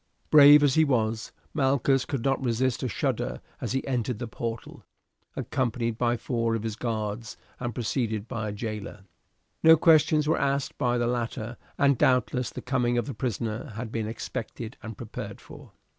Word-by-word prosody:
Brave 145 Hz, 0 st, +9 dB
as 140 Hz, -3 st, +4 dB
he 160 Hz, -, +5 dB
was, 115 Hz, -6 st, 0 dB, 0.2 s
Malchus 135 Hz, -2 st, +2 dB
could 135 Hz, -5 st, -3 dB
not 135 Hz, -1 st, +1 dB
resist 125 Hz, +1 st, 0 dB
a 130 Hz, -, -1 dB
shudder 115 Hz, -, -2 dB, 0.2 s
as -, -, -2 dB
he 135 Hz, -, -1 dB
entered 125 Hz, -3 st, -1 dB
the 120 Hz, +1 st, -5 dB
portal, 115 Hz, 0 st, -6 dB, 0.5 s
accompanied 115 Hz, -3 st, -2 dB
by 120 Hz, 0 st, +2 dB
four 115 Hz, -2 st, -1 dB
of 110 Hz, -, -3 dB
his 110 Hz, -2 st, -3 dB
guards 110 Hz, -1 st, -3 dB, 0.2 s
and 120 Hz, -3 st, -4 dB
preceded 115 Hz, -2 st, -2 dB
by 110 Hz, -2 st, -3 dB
a -, -, -3 dB
jailer. 105 Hz, -2 st, -6 dB, 0.6 s
No 160 Hz, 0 st, +8 dB
questions 155 Hz, -1 st, +4 dB
were 160 Hz, -, +2 dB
asked 140 Hz, 0 st, 0 dB
by 125 Hz, -3 st, +1 dB
the 120 Hz, -, +1 dB
latter, 120 Hz, -1 st, -2 dB, 0.2 s
and 140 Hz, -3 st, +3 dB
doubtless 125 Hz, -1 st, +2 dB
the -, -, -8 dB
coming 125 Hz, -2 st, +1 dB
of 120 Hz, -, 0 dB
the 140 Hz, -, -5 dB
prisoner 115 Hz, +1 st, -3 dB
had 115 Hz, 0 st, -5 dB
been 110 Hz, -2 st, -2 dB
expected 115 Hz, +1 st, -6 dB
and 110 Hz, -1 st, -8 dB
prepared -, -, -7 dB
for. -, -, -13 dB
120 Hz, 175 wpm, -27 LUFS, 115-135 Hz, 0.6 s, Brave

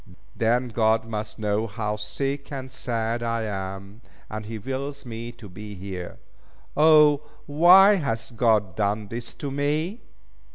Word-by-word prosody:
Then 120 Hz, +2 st, +1 dB
God 110 Hz, 0 st, +2 dB
must 110 Hz, -1 st, -5 dB
know 105 Hz, 0 st, 0 dB
how 105 Hz, 0 st, -3 dB
sick 135 Hz, +7 st, -3 dB
and 130 Hz, -2 st, -6 dB
sad 120 Hz, -3 st, -2 dB
I 115 Hz, -1 st, -1 dB
am, 100 Hz, +1 st, -6 dB, 0.3 s
and 110 Hz, -1 st, -5 dB
He 115 Hz, 0 st, -5 dB
wills 135 Hz, +5 st, -5 dB
me 115 Hz, 0 st, -6 dB
to 115 Hz, -3 st, -12 dB
be 105 Hz, +2 st, -9 dB
here. 90 Hz, -2 st, -7 dB, 0.6 s
O, 150 Hz, -1 st, +6 dB, 0.2 s
why 180 Hz, +7 st, +7 dB
hath 115 Hz, -7 st, -3 dB
God 110 Hz, -6 st, +2 dB
done 105 Hz, 0 st, -1 dB
this 115 Hz, +1 st, -6 dB
to 140 Hz, -, -5 dB
me!" 150 Hz, -, -1 dB
115 Hz, 140 wpm, -25 LUFS, 105-140 Hz, 0.6 s, why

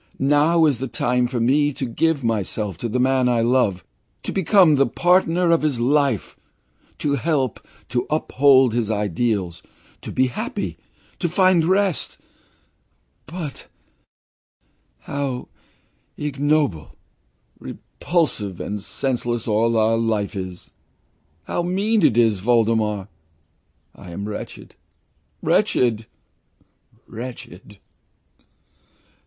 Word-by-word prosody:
Now 150 Hz, +4 st, +3 dB
is 140 Hz, -6 st, +1 dB
the 135 Hz, -, -3 dB
time 125 Hz, 0 st, 0 dB
for 125 Hz, -1 st, -3 dB
me 145 Hz, +5 st, +2 dB
to 130 Hz, -, -4 dB
give 145 Hz, +4 st, 0 dB
myself 105 Hz, -3 st, -1 dB
to 115 Hz, -, -3 dB
the 125 Hz, +3 st, -1 dB
man 130 Hz, 0 st, +2 dB
I 120 Hz, -2 st, +2 dB
love, 115 Hz, -7 st, +1 dB, 0.4 s
to -, -, -4 dB
become 190 Hz, -2 st, +4 dB
the 140 Hz, -1 st, +3 dB
partner 175 Hz, -1 st, +2 dB
of 165 Hz, -, +3 dB
his 150 Hz, -5 st, 0 dB
life, 135 Hz, -3 st, +1 dB, 0.6 s
to 145 Hz, -, -1 dB
help, 140 Hz, -3 st, 0 dB, 0.3 s
to 120 Hz, 0 st, -1 dB
uphold 135 Hz, -4 st, +4 dB
his 115 Hz, -3 st, -1 dB
ideals, 105 Hz, -3 st, -1 dB, 0.4 s
to -, -, -7 dB
be 130 Hz, -, +2 dB
happy 125 Hz, -, -4 dB, 0.4 s
to 175 Hz, -, -1 dB
find 185 Hz, -1 st, +3 dB
rest 190 Hz, 0 st, 0 dB, 1.1 s
but 160 Hz, -4 st, -7 dB, 1.3 s
how 140 Hz, -3 st, -4 dB, 0.7 s
ignoble, 145 Hz, -, -1 dB, 0.6 s
repulsive, 110 Hz, -, -3 dB
and 105 Hz, 0 st, -4 dB
senseless 120 Hz, 0 st, -2 dB
all 115 Hz, +1 st, +2 dB
our 110 Hz, +1 st, +3 dB
life 110 Hz, -2 st, -1 dB
is! 95 Hz, -2 st, -7 dB, 0.7 s
How 175 Hz, -, -2 dB
mean 200 Hz, +4 st, 0 dB
it 130 Hz, -7 st, +4 dB
all 120 Hz, -, +6 dB
is, 110 Hz, -4 st, +1 dB
Voldemar. 110 Hz, -2 st, +1 dB, 0.9 s
I 90 Hz, -, -13 dB
am 100 Hz, +4 st, -5 dB
wretched, 105 Hz, -, -8 dB, 0.7 s
wretched, 115 Hz, -3 st, +1 dB, 1.0 s
wretched! 110 Hz, -5 st, -9 dB
125 Hz, 110 wpm, -22 LUFS, 110-150 Hz, 1.3 s, all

